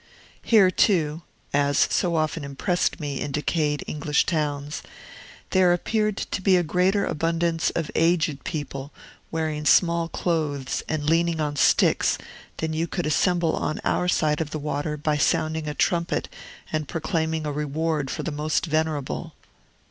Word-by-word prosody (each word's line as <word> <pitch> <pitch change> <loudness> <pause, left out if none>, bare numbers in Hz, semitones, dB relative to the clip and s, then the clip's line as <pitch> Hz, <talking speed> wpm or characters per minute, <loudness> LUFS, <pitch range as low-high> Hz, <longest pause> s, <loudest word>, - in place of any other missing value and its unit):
Here, 200 -5 +5
too 165 -5 +2 0.3
(as 145 0 +2
so 175 -2 +1
often 155 0 -1
impressed 175 +8 -1
me 145 -3 -4
in 145 - -3
decayed 150 0 0
English 150 0 0
towns), 150 -2 -2 0.7
there 185 -2 +5
appeared 215 +3 0
to 190 - -3
be 185 -1 +4
a 175 - +2
greater 185 +5 +2
abundance 165 +1 0
of 165 -3 -2
aged 160 -4 +1
people 140 -2 -5 0.4
wearing 155 -2 -2
small 170 +2 +4
clothes 150 -7 -1
and 155 -2 -1
leaning 165 0 +2
on 150 -1 -1
sticks - - +3 0.4
than 160 0 -2
you 165 +2 -1
could 175 0 -3
assemble 170 +2 +2
on 155 - -2
our 180 - +1
side 155 -3 +1
of 155 - -3
the 155 - -4
water 150 0 -3
by 150 0 0
sounding 160 0 +1
a 150 - -3
trumpet 170 +2 0 0.5
and 155 -2 -1
proclaiming 160 -1 -1
a 150 - -1
reward 150 0 -1
for - - -4
the 170 - -3
most 150 +3 -1
venerable. 155 -3 -2
160 Hz, 150 wpm, -24 LUFS, 150-170 Hz, 0.7 s, Here